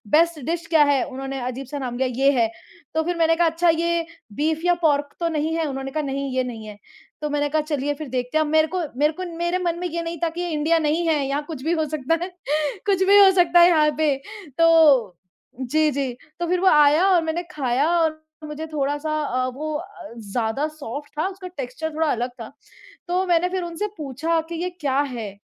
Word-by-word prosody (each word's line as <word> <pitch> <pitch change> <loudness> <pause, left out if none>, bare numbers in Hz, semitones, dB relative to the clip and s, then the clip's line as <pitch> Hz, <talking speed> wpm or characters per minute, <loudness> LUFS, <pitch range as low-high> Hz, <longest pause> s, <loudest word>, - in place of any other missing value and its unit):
Best 335 -1 +3
dish 335 0 -2
क्या 320 -3 +5
है?" 280 -2 +2
उन्होंने 270 0 -5
अजीब 255 +2 -5
सा 290 - -5
नाम 245 -2 -4
लिया 260 0 +1 0.2
ये 280 - +7
है, 230 - +4 0.5
तो 320 0 +1
फिर 350 +1 -2
मैंने 330 0 +3
कहा, 340 0 +3
"अच्छा 335 +2 +2
ये 335 +1 +1 0.3
बीफ 310 +2 0
या 355 - +5
पोर्क 290 -2 +1
तो 340 - 0
नहीं 315 +1 -1
है?" 330 -1 0
उन्होंने 270 -1 -5
कहा, 305 +1 -2
"नहीं, 275 0 -3
ये 255 - +2
नहीं 225 -3 -7
है।" 210 - -9 0.4
तो 300 - -2
मैंने 290 0 0
कहा 310 +1 +1
चलिए 290 -2 -2
फिर 300 0 -7
देखते 250 +3 -2
हैं, 310 - +3
अब - - -4
मेरे 315 0 +4
को 365 - 0 0.2
मेरे 300 +2 +3
को 370 +4 -5
मेरे 345 +1 0
मन 345 -1 -1
में 360 - -2
ये 335 0 -3
नहीं 335 0 -5
था 330 - +2
कि 340 +2 -6
ये 350 - -2
इंडिया 320 +2 +2
नहीं 315 +3 0
है, 310 -2 +2
यहाँ 285 +2 -1
कुछ 300 -5 -7
भी 325 - 0
हो - - +1
सकता 305 +4 0
है 370 - -4 0.6
कुछ 385 -2 +2
भी 405 +1 +7
हो 390 -1 +8
सकता 350 -1 +5
है 345 - +8
यहाँ 305 -3 +4
पे। 305 -3 +2 0.4
तो, 300 - +5 0.4
जी, 305 +5 +2
जी। 270 -2 -2 0.3
तो 345 - -1
फिर 360 +1 +1
वो 380 - +2
आया 300 +3 +5
और 355 -3 +4
मैंने 325 +2 -2
खाया 275 -1 0
और 315 -1 0 0.2
मुझे 305 +1 -6
थोड़ा-सा 290 +2 -1
अ, 255 -3 -1
वो 310 +2 -4
अ, 375 - -11
ज़्यादा 225 +6 -2
सॉफ्ट 290 -2 -8
था, 315 - +1
उसका 380 -1 -8
टेक्सचर 310 -1 -5
थोड़ा 320 -2 +1
अलग 245 +2 -1
था। - - -8 0.6
तो 365 +2 0
मैंने 355 0 +2
फिर 370 -1 -2
उनसे 345 +4 -3
पूछा 310 +3 -1
कि 340 - -4
ये 360 - -1
क्या 290 -7 -1
है? 230 -8 -5
310 Hz, 230 wpm, -23 LUFS, 275-335 Hz, 0.6 s, हो